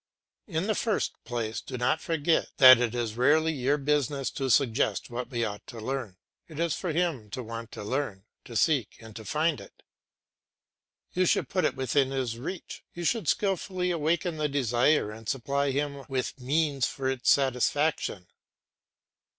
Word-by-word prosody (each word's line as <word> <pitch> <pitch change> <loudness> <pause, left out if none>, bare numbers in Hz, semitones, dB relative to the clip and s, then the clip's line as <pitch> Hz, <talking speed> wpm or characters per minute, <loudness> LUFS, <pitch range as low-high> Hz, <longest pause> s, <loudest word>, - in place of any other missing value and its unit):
In 165 -2 -1
the 215 - +1
first 220 0 -1
place 115 -3 -3
do 130 - -6
not 130 +6 +1
forget 165 0 +1
that 130 -2 +10
it 120 -1 0
is 115 -2 -2
rarely 155 +5 +3
your 140 +1 +1
business 145 -1 0
to 135 -2 -3
suggest 115 -4 +2
what 125 +2 -5
he 120 -2 0
ought 105 -1 -6
to 115 - -9
learn; 115 -5 -4 0.3
it 155 -2 -9
is 170 -2 +1
for 180 - -3
him 155 -10 -1
to 125 +5 -5
want 115 0 -7
to - - -7
learn, 110 -4 -3 0.2
to 120 - -10
seek 135 -4 +1
and 110 -2 -12
to 110 - -8
find 155 +5 0
it. - - -16 1.3
You 185 0 +2
should - - +1
put 185 - +1
it - - 0
within 130 +1 +1
his 130 -4 -2
reach, 165 +7 -7
you 175 - -5
should 170 +2 0
skilfully 185 0 0
awaken 170 +1 0
the 150 -1 0
desire 125 -2 +2
and 110 0 -8
supply 140 +2 0
him 140 0 -2
with 130 0 -2
means 140 0 +1
for 135 -1 -4
its 130 -2 0
satisfaction. 135 - +1
135 Hz, 170 wpm, -28 LUFS, 120-155 Hz, 1.3 s, that